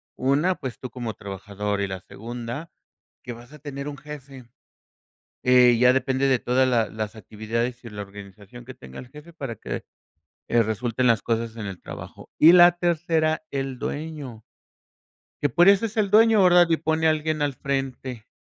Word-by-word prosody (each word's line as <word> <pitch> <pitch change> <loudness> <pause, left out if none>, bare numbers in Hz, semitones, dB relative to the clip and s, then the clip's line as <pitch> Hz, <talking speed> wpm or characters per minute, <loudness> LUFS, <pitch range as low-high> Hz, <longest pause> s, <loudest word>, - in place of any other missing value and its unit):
una, 145 +8 +1
pues 125 -4 -7
tú 130 - -7
como 120 -3 -5
trabajador, 100 +1 -5
y 100 - 0
la 95 -1 -5
segunda, 120 - -7 0.5
que 120 - -6
vas 120 +4 -14
a 150 - -12
tener 140 0 -7
un 145 - -6
jefe. 140 -4 -10 1.0
Eh, 125 -1 +6
ya 125 0 +6
depende 130 +1 +1
de 130 - +3
toda 130 +2 +1
la 115 -3 +2
las 110 0 -5
actividades 115 +4 -4
y 115 - -8
la 105 -1 -7
organización 100 +3 -12
que 130 +1 -10
tenga 65 - -11
el 125 - -10
jefe 150 +6 -14
para 135 -8 -6
que, - - -6 0.6
eh, 120 - +4
resulten 115 +3 -1
las 115 -3 +3
cosas 115 0 -2
en 110 - -6
el 95 -2 -7
trabajo. - - -10
Y 165 +3 +8
la 175 0 +8
tercera, 160 -2 0
el 135 -2 -4
dueño. 145 -6 -6 1.0
Que 145 - +3
por 175 +8 +4
eso 200 +3 +5
es 220 - -10
el 210 -3 +1
dueño, 220 0 +6
¿verdad?, 175 -1 +6
y 165 - +4
pone 160 +1 0
alguien 155 -1 0
al 145 -2 0
frente. 130 -3 -4
130 Hz, 180 wpm, -24 LUFS, 115-155 Hz, 1.0 s, Y